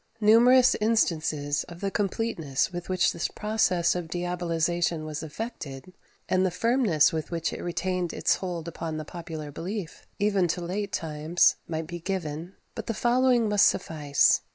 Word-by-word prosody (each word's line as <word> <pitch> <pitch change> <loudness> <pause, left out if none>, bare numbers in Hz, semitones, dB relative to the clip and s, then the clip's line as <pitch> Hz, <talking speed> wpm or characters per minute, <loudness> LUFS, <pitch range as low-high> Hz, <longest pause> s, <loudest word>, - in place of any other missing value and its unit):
Numerous 240 +4 +6
instances 155 -9 +1
of 170 -1 -11
the 195 0 -2
completeness 190 -9 -1
with 175 +1 -6
which 185 -1 +2
this 170 - -1
process 210 -5 +1
of 175 -2 -4
diabolization 175 -1 -1
was 155 -1 -5
effected, 160 - -7 0.3
and 185 0 +2
the 190 - +2
firmness 200 - +2
with 160 -2 -3
which 165 -1 -2
it - - -6
retained 175 0 -2
its - - +1
hold 175 -3 -5
upon 165 -1 -4
the 155 - -5
popular 160 -3 -7
belief, 185 +3 -6
even 200 -3 +2
to 175 +2 -2
late 195 +4 -3
times, 160 0 +2
might 160 -1 -3
be 175 +1 -7
given; 170 -1 -4 0.2
but - - -7
the 230 - -2
following 245 0 +3
must 205 -1 +5
suffice. 150 -5 +2
175 Hz, 155 wpm, -27 LUFS, 160-200 Hz, 0.3 s, Numerous